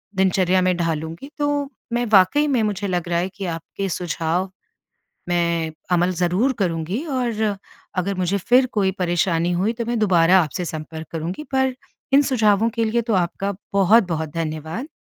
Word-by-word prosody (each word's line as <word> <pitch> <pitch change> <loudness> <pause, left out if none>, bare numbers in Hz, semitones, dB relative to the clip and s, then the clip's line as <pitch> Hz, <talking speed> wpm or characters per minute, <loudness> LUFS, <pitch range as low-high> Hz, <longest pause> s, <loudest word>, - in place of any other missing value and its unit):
दिनचर्या 185 -1 +2
में 185 0 +2
ढालूँगी। 165 - -3
तो 290 -1 0 0.2
मैं 240 0 +1
वाक़ई 200 +11 +5
में 265 -5 +2
मुझे 205 -1 -1
लग 175 -2 -2
रहा 170 -1 +1
है 180 +2 -1
कि 200 - -5
आपके 175 +3 -4
सुझाव 175 +1 -2 0.8
मैं 170 -2 0 0.2
अमल 175 +1 +3
ज़रूर 190 +10 +2
करूँगी। 180 - -1
और 245 -6 -1 0.5
अगर 190 +2 -1
मुझे 185 +2 0
फिर 250 +7 +4
कोई 195 -3 +2
परेशानी 175 -1 +1
हुई, 190 +6 +1
तो 235 0 -4
मैं 240 0 -1
दुबारा 185 -3 +5
आपसे 165 +3 -3
संपर्क 160 0 -6
करूँगी। 170 - -4
पर 265 -1 +2 0.4
इन 280 - +7
सुझावों 220 -5 +2
के 230 0 -1
लिए 230 +2 +1
तो 225 -1 -1
आपका 190 +2 -1 0.2
बहुत-बहुत 190 -5 +3
धन्यवाद। 160 - -4
185 Hz, 160 wpm, -22 LUFS, 170-225 Hz, 0.8 s, इन